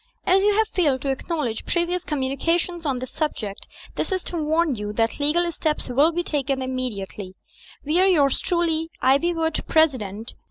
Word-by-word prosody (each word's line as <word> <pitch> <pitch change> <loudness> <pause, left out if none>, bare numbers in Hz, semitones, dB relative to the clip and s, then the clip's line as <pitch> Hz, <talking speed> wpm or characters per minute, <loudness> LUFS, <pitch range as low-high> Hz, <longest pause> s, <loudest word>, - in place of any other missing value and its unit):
"As 380 +2 +4
you 410 0 +3
have 440 0 +3
failed 290 - +1
to 275 - +1
acknowledge 270 -5 -2
previous 350 +1 -1
commumja 290 +3 0
tions 345 -2 -4
on 270 -3 0
this 255 0 -6
subject, 220 -10 -3 0.3
this - - -3
is 370 -1 -1
to - - -6
warn 315 0 +2
you 210 -3 -4
that 225 +4 0
legal 340 +4 +2
steps 310 -4 -2
^11 290 +7 +3
be 350 - 0
taken 275 -4 -1
immediately, 210 -7 -5 0.5
"We 310 +5 +2
are 380 - +5
yours 290 -8 +3
truly, 330 -2 0
IvYwooD, 320 +4 +2
President. 230 -9 +1
300 Hz, 170 wpm, -23 LUFS, 255-340 Hz, 0.5 s, are